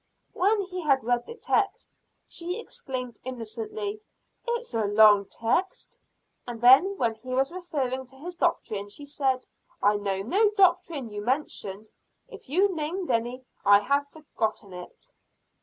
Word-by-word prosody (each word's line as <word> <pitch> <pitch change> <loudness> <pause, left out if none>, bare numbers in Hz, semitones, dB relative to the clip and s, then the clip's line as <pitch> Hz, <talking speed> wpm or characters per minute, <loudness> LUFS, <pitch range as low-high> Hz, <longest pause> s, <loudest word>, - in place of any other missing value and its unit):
When 410 +3 +2
he 370 -1 -6
had 275 -5 +2
read 240 +1 0
the 465 - -8
text, 420 -3 -1 0.3
she 355 +4 -3
exclaimed 255 - -5
insolently, 410 - -5 0.5
"It's 475 - -2
a 225 -2 +1
long 205 -1 +6
text." 235 - -2 0.5
And 240 -1 -6
then 270 - +6
when 230 -3 +1
he 255 +3 -6
was 270 +3 +1
referring 270 -8 -3
to 265 - -15
his 335 +7 -8
doctrine, 215 - -1
she 285 +8 -8
said: 270 -3 0 0.3
"I 205 +1 +3
know 195 -1 -2
no 405 - +3
doctrine 340 - +2
you 205 - -4
mentioned. 220 -5 -2 0.4
If - - -12
you 380 +6 +3
named 330 +2 -2
any, 240 +2 -1 0.2
I 200 0 +6
have 280 +5 +1
forgotten 220 -10 -4
it." 180 - -10
265 Hz, 145 wpm, -27 LUFS, 225-360 Hz, 0.5 s, long